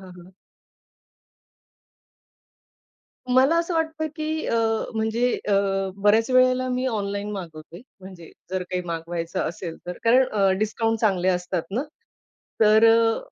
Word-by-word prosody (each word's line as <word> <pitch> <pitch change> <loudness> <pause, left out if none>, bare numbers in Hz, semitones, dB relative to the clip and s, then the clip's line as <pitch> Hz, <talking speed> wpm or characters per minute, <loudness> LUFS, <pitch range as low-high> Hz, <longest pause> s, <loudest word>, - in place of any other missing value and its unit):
हां, 180 - -12
हां. 185 - -18 3.0
मला 265 +6 +4
असं 335 0 -2
वाटतं 320 -1 -1
की 315 0 -3
अ, 230 - 0 0.4
म्हणजे 225 +3 0 0.2
अ, - - +2 0.4
बऱ्याच 215 +5 +2
वेळेला 255 0 +3
मी 255 +1 -1
ऑनलाईन 205 -3 -3
मागवते 170 -2 -9 0.2
म्हणजे 185 -3 -12 0.2
जर 185 -1 -2
काही 180 0 -2
मागवायचं 170 0 -4
असेल 165 0 -7
तर. 180 - -6
कारण 250 +3 +5
अ, 200 -2 +2
डिस्काउंट 225 +1 -1
चांगले 190 -4 +1
असतात 180 -1 -1
ना. 230 +7 -1 0.8
तर 215 +1 +5
अ, 225 0 +3
215 Hz, 125 wpm, -23 LUFS, 180-250 Hz, 3.0 s, कारण